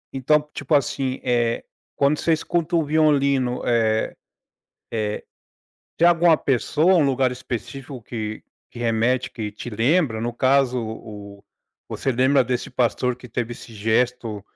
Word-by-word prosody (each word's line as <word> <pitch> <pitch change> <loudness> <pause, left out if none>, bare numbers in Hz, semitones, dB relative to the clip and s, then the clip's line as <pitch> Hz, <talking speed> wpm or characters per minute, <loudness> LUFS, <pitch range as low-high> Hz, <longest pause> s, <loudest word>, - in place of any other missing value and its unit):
Então, 140 +3 +2
tipo 145 +2 0
assim, 135 -2 -1
eh, 120 -2 +1 0.3
quando 140 +2 +2
você 165 - +2
escuta 170 +2 -1
o 165 - +3
violino, 140 -4 +2
eh 110 -2 +1 0.8
eh, 105 -2 -2 0.7
tem 170 - +4
alguma 170 -1 +5
pessoa, 150 +7 +2
um 160 - +4
lugar 130 -1 +2
específico 125 +1 -6
que 110 -1 -5 0.3
que - - -11
remete 120 +2 +1
que 110 -3 -5
te 105 - -8
lembra? 120 - +1
No 120 +1 -2
caso, 130 0 +2
o 105 -2 -9 0.5
você 135 - -2
lembra 130 +3 +3
desse 125 0 -3
pastor 125 0 0
que 125 0 -13
teve 120 0 -3
esse 120 - -11
gesto 115 0 0
125 Hz, 140 wpm, -22 LUFS, 115-140 Hz, 0.8 s, alguma